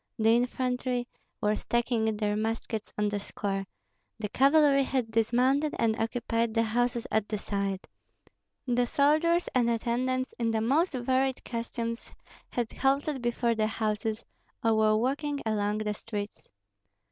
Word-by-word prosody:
The 225 Hz, 0 st, +4 dB
infantry 250 Hz, 0 st, -1 dB, 0.3 s
were 210 Hz, +1 st, +2 dB
stacking 225 Hz, -2 st, 0 dB
their 210 Hz, -1 st, 0 dB
muskets 220 Hz, 0 st, -3 dB
on 210 Hz, 0 st, +1 dB
the 205 Hz, 0 st, -2 dB
square; 195 Hz, -1 st, -3 dB, 0.5 s
the 215 Hz, -1 st, -4 dB
cavalry 275 Hz, +2 st, +5 dB
had 260 Hz, -4 st, -1 dB
dismounted 250 Hz, +6 st, +2 dB
and 225 Hz, -1 st, +2 dB
occupied 230 Hz, 0 st, -1 dB
the 230 Hz, -, +4 dB
houses 240 Hz, +1 st, 0 dB
at 220 Hz, -1 st, +1 dB
the 215 Hz, -, -1 dB
side. 200 Hz, -1 st, -3 dB, 0.8 s
The 245 Hz, -1 st, +1 dB
soldiers 310 Hz, +6 st, +3 dB
and 245 Hz, -2 st, +3 dB
attendants 255 Hz, +3 st, -1 dB
in 230 Hz, -1 st, +1 dB
the 225 Hz, -1 st, +1 dB
most 295 Hz, +10 st, +2 dB
varied 260 Hz, +1 st, 0 dB
costumes 230 Hz, 0 st, -4 dB, 0.4 s
had 240 Hz, -3 st, -2 dB
halted 275 Hz, 0 st, +1 dB
before 240 Hz, 0 st, +1 dB
the 215 Hz, -1 st, +1 dB
houses, 220 Hz, 0 st, -2 dB, 0.4 s
or 225 Hz, -1 st, +4 dB
were 215 Hz, 0 st, +4 dB
walking 285 Hz, +5 st, -1 dB
along 210 Hz, -1 st, 0 dB
the 215 Hz, -1 st, -1 dB
streets. 205 Hz, -1 st, -6 dB
230 Hz, 140 wpm, -29 LUFS, 220-255 Hz, 0.8 s, cavalry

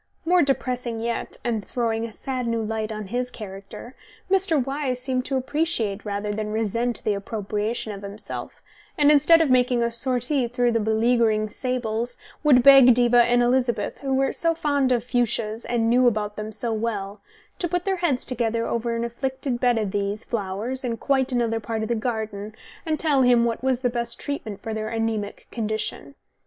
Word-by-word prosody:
More 355 Hz, +1 st, +4 dB
depressing 250 Hz, -4 st, -1 dB
yet 235 Hz, 0 st, -3 dB
(and 225 Hz, -4 st, -1 dB
throwing 230 Hz, -1 st, -1 dB
a 230 Hz, -, -7 dB
sad 255 Hz, +2 st, -4 dB
new 230 Hz, -1 st, 0 dB
light 220 Hz, 0 st, -3 dB
on 215 Hz, -2 st, -6 dB
his 250 Hz, +2 st, -1 dB
character), 200 Hz, +2 st, -9 dB, 0.4 s
Mr. 380 Hz, -5 st, +3 dB
Wyse 270 Hz, -1 st, -2 dB
seemed 255 Hz, 0 st, -2 dB
to 270 Hz, -, -1 dB
appreciate 255 Hz, -, -1 dB
rather 205 Hz, 0 st, -3 dB
than 210 Hz, 0 st, -3 dB
resent 225 Hz, +2 st, -1 dB
the 210 Hz, -, +1 dB
appropriation 210 Hz, +2 st, -3 dB
of 200 Hz, -, -8 dB
himself, 200 Hz, +1 st, -8 dB, 0.3 s
and 295 Hz, 0 st, +5 dB
instead 300 Hz, +3 st, +6 dB
of 305 Hz, -5 st, +2 dB
making 250 Hz, -1 st, +3 dB
a 235 Hz, -, 0 dB
sortie 250 Hz, +2 st, 0 dB
through 245 Hz, 0 st, +1 dB
the 230 Hz, -, +1 dB
beleaguering 220 Hz, 0 st, +2 dB
sables, 240 Hz, -1 st, -2 dB, 0.3 s
would 265 Hz, -5 st, +6 dB
beg 270 Hz, -3 st, +9 dB
Diva 240 Hz, 0 st, +5 dB
and 245 Hz, 0 st, +3 dB
Elizabeth, 245 Hz, 0 st, 0 dB
who 275 Hz, -1 st, -3 dB
were 270 Hz, 0 st, +1 dB
so 330 Hz, 0 st, 0 dB
fond 285 Hz, -4 st, +1 dB
of 240 Hz, -3 st, +2 dB
fuchsias 230 Hz, -2 st, -1 dB
and 235 Hz, -2 st, 0 dB
knew 245 Hz, +2 st, +4 dB
about 210 Hz, -2 st, 0 dB
them 215 Hz, +1 st, -5 dB
so 225 Hz, +2 st, -3 dB
well, 210 Hz, -2 st, -3 dB, 0.4 s
to 355 Hz, -, +1 dB
put 355 Hz, +1 st, -2 dB
their 385 Hz, -1 st, 0 dB
heads 320 Hz, -8 st, 0 dB
together 230 Hz, -2 st, -1 dB
over 235 Hz, 0 st, -1 dB
an 230 Hz, -, -1 dB
afflicted 260 Hz, +1 st, -3 dB
bed 245 Hz, -2 st, +3 dB
of 210 Hz, -3 st, -1 dB
these 205 Hz, +2 st, -2 dB
flowers 225 Hz, +4 st, -3 dB
in 235 Hz, -2 st, -2 dB
quite 265 Hz, +1 st, +1 dB
another 230 Hz, -2 st, 0 dB
part 225 Hz, 0 st, -3 dB
of 220 Hz, -, -4 dB
the -, -, +2 dB
garden, 220 Hz, -2 st, -3 dB, 0.3 s
and 310 Hz, -1 st, 0 dB
tell 290 Hz, -4 st, +3 dB
him 245 Hz, -2 st, +5 dB
what 235 Hz, +1 st, -2 dB
was 260 Hz, -1 st, +1 dB
the 250 Hz, -, +2 dB
best 235 Hz, -1 st, -3 dB
treatment 225 Hz, -8 st, -5 dB
for 225 Hz, -, -4 dB
their 215 Hz, 0 st, -3 dB
anæmic 225 Hz, -2 st, -3 dB
condition. 215 Hz, -10 st, -4 dB
235 Hz, 185 wpm, -24 LUFS, 220-255 Hz, 0.4 s, beg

